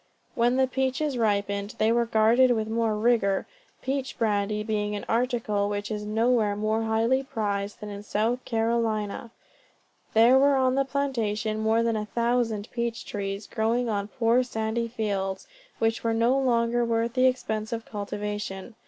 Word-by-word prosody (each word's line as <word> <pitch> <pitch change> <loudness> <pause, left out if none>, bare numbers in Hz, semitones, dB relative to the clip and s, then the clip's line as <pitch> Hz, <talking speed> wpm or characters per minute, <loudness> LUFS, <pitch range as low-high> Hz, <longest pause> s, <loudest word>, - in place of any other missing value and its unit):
When 240 +2 +2
the 265 0 +4
peaches 265 +2 -1
ripened, 200 -2 -1
they 220 +1 +3
were 235 0 +2
guarded 230 +4 +4
with 220 -3 +1
more 225 -1 0
rigor 210 -4 +2 0.4
peach 270 0 -3
brandy 210 -1 0
being 210 -1 -1
an 205 - -5
article 225 -4 0
which 205 +1 -3
is 210 -1 -3
nowhere 220 -1 +2
more 215 +2 0
highly 225 +4 +1
prized 210 -6 -3
than 210 - -6
in 200 0 -7
South 220 +4 -1
Carolina. 225 -1 -1 0.9
There 235 +4 +6
were 280 0 +4
on 260 -1 +2
the 275 +1 +1
plantation 225 -6 -1
more 220 +1 +2
than 230 -1 +1
a 210 -1 -3
thousand 235 -2 0
peach 235 -1 -3
trees, 200 0 -4
growing 230 +3 0
on 200 -2 -1
poor 230 +2 +2
sandy 230 -1 -2
fields, 200 -4 -3 0.3
which 225 0 0
were 230 -1 +1
no 235 +3 +3
longer 240 -2 +2
worth 230 0 0
the 255 0 +4
expense 220 -4 -2
of 230 -1 -4
cultivation. 205 0 -5
225 Hz, 160 wpm, -26 LUFS, 210-240 Hz, 0.9 s, There